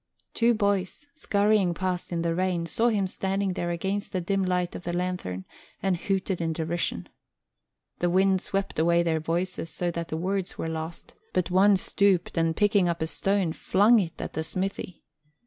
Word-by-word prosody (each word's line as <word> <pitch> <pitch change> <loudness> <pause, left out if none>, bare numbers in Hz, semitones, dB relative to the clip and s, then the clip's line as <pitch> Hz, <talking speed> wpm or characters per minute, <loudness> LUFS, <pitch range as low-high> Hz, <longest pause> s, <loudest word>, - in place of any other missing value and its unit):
Two 235 0 +3
boys, 200 +3 0
scurrying 205 - +2
past 180 -1 -2
in 170 -1 -1
the 165 -1 +1
rain, 180 -1 0
saw 225 +7 +1
him 210 -4 +2
standing 195 +1 -1
there 175 -1 -2
against 190 +4 -2
the 185 - -1
dim 195 +2 0
light 180 -1 0
of - - -7
the 175 - -3
lanthorn, 175 - -3 0.3
and 190 -2 +1
hooted 190 0 -1
in 165 -1 0
derision. 160 - -2 0.9
The 175 - +1
wind 190 +1 +3
swept 195 -4 -2
away 170 +1 +3
their 160 -2 +1
voices 170 +1 -2
so 175 +3 -2
that 170 0 -4
the 160 - -3
words 190 +2 -2
were - - -3
lost, 160 +1 -6 0.2
but 180 -2 0
one 195 +2 +5
stooped 190 -1 +1
and, 165 -1 +1
picking 205 -2 +3
up 170 -1 -1
a - - +1
stone, 195 0 0
flung 210 +8 +4
it 170 -4 -3
at - - -5
the 160 - -2
smithy. 185 +1 -3
180 Hz, 180 wpm, -27 LUFS, 170-195 Hz, 0.9 s, one